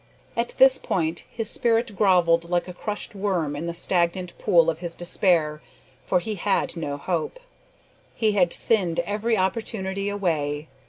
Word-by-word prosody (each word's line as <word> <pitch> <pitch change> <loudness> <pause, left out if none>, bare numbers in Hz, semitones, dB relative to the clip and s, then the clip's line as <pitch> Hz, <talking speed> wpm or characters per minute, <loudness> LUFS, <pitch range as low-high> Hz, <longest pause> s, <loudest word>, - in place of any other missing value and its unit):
At 235 0 -2
this 265 0 +7
point 165 -2 -2
his 225 -2 -3
spirit 230 -2 +1
grovelled 170 -4 +3
like 175 0 0
a 180 - -7
crushed 210 +4 -5
worm 185 -7 -1
in 160 +4 -4
the 170 - -3
stagnant 175 0 0
pool 170 -2 +4
of 160 - -9
his 170 -1 -5
despair, 170 -4 +1 0.4
for 180 - +1
he 220 +4 -4
had 200 0 -1
no 145 -4 -4
hope. 170 - -3 0.8
He 220 -2 +2
had 180 -4 +2
sinned 185 -7 +1
every 215 +2 -1
opportunity 195 0 -2
away. 155 -7 -2
180 Hz, 155 wpm, -24 LUFS, 170-210 Hz, 0.8 s, this